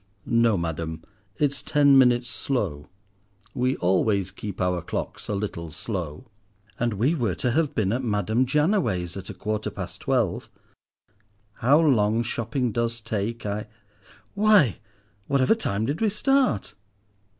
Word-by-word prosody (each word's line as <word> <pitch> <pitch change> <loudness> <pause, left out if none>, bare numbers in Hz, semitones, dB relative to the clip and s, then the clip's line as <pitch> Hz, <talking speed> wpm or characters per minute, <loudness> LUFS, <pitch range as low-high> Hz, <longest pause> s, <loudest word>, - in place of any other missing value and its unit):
"No, 115 -3 +3
madam, 80 -1 -4 0.3
it's 140 -2 0
ten 145 -2 +4
minutes 125 -2 +5
slow. 85 - -3 0.6
We 130 +1 0
always 95 +1 +1
keep 100 -1 -7
our 90 -1 0
clocks - - -5
a 105 - -1
little 85 -5 -4
slow!" 90 - -5 0.5
"And 120 -2 0
we 125 +11 +2
were 115 - -1
too 125 - -1
have 150 +3 0
been 105 -2 +1
at 130 +2 -1
Madame 110 +3 +1
Jannaway's 135 - +1
at 95 -1 -7
a - - -7
quarter 110 0 -3
past - - -7
twelve. - - 0 1.1
How 140 +6 +4
long 115 -7 +3
shopping 120 +1 -2
does 115 +1 -1
take! 110 +1 -3 0.9
Why, 205 - +4 0.5
whatever 140 +4 +3
time 110 - -1
did 145 - -2
we 220 - +3
start?" 265 - +1
115 Hz, 135 wpm, -25 LUFS, 100-140 Hz, 1.1 s, minutes